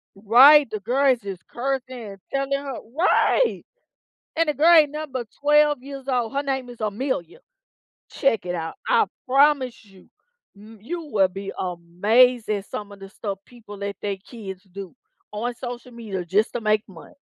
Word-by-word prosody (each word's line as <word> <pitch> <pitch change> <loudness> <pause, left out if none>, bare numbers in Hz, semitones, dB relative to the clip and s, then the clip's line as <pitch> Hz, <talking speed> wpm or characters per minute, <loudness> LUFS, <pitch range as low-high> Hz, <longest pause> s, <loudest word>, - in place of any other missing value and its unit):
Right, 255 +8 +7
the 215 - -4
girl 260 +6 +2
is 245 - -6
just 195 -3 -8
cursing 265 +1 -2 0.2
and 195 -2 -10
telling 275 0 -1
her 275 -2 -3 0.2
Right! 455 +7 +2 0.7
And 330 -1 +2
the 300 - +1
girl 330 +4 +5
ain't 300 -3 +6
nothing 305 -2 -6
but 240 -4 -4
12 295 -2 +3
years 275 0 -9
old, 245 -3 0
her 280 +1 -1
name 265 -3 -3
is 240 -2 -13
Amelia. 210 - -3 0.7
Check 225 -8 +1
it 175 - -2
out, 165 -1 -4
I 465 -3 +4 0.2
promise 265 -3 +2
you 195 -2 -19 0.5
m 215 +2 -14
you 335 +8 -5
will 195 -3 +4
be 195 +1 -7
amazed 205 +8 +2
at 200 -2 -1
some 205 -1 -6
of 200 - -12
the 195 - -9
stuff 200 -1 -6
people 230 -4 -13
let 200 -1 -4
they 200 -1 -2
kids 195 -3 -9
do 195 0 -8 0.4
on 235 +4 -3
social 245 0 -8
media 210 -6 -5
just 205 +6 +1
to 240 - -3
make 215 -1 +2
money. 180 - -14
235 Hz, 175 wpm, -23 LUFS, 200-275 Hz, 0.7 s, Right